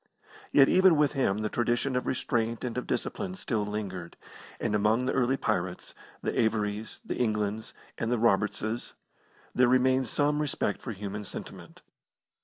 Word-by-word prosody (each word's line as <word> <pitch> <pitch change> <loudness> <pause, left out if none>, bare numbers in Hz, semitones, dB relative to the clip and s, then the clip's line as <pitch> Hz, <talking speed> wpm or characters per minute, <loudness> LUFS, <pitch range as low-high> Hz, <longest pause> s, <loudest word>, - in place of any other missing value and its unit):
Yet 135 -1 +7
even 185 -3 +5
with 145 -1 +3
him 125 -8 +1
the - - +1
tradition 120 +3 0
of 125 - -1
restraint 115 -3 -1
and 125 -2 -3
of 125 - -3
discipline 190 -3 -2
still 115 - -1
lingered; 100 -4 -5 0.4
and - - -1
among 105 +4 +2
the 130 - 0
early 130 +2 +2
pirates, 95 -7 -2 0.3
the - - 0
Avorys, 110 -1 -1
the - - -3
Englands, 110 -2 -1 0.2
and 115 - -1
the 125 - +2
Robertses, 110 +1 0 0.6
there 125 0 +4
remained 130 +1 +3
some 150 +5 +1
respect 135 -8 -1
for 120 - -5
human 105 +1 -5
sentiment. - - -9
115 Hz, 155 wpm, -29 LUFS, 105-130 Hz, 0.6 s, Yet